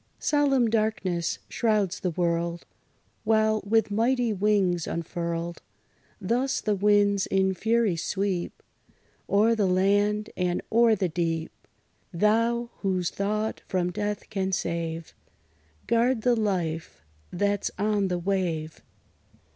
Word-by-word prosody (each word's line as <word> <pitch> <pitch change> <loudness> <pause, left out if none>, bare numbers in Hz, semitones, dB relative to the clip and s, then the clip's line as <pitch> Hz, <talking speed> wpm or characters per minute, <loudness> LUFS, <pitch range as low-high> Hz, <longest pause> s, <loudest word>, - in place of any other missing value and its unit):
Solemn 275 -5 +2
darkness 215 -6 0
shrouds 210 -5 0
the 185 - -1
world; 170 0 -1 0.6
While, 220 -1 +2
with 215 0 +1
mighty 235 +2 +1
wings 190 -4 +1
unfurled, 170 0 -4 0.6
Thus 240 +7 0
the 210 - 0
winds 205 0 +3
in 190 0 +2
fury 220 0 +1
sweep 190 +2 -2 0.7
O'er 215 +3 +4
the 210 -4 +1
land, 205 +3 +2
and 180 -1 -1
o'er 230 0 +5
the 190 -2 0
deep, 165 -1 -2 0.6
Thou, 230 +5 +1
whose 185 -3 -1
thought 210 +2 -2
from 180 -2 0
death 205 +2 -3
can 190 -2 -1
save, 165 -2 -3 0.7
Guard 235 0 +2
the 245 -1 +4
life 175 - -2 0.3
that 200 +2 0
's - - -1
on 205 -1 +1
the 180 -1 -1
wave! 175 -4 -2
200 Hz, 115 wpm, -26 LUFS, 175-220 Hz, 0.7 s, o'er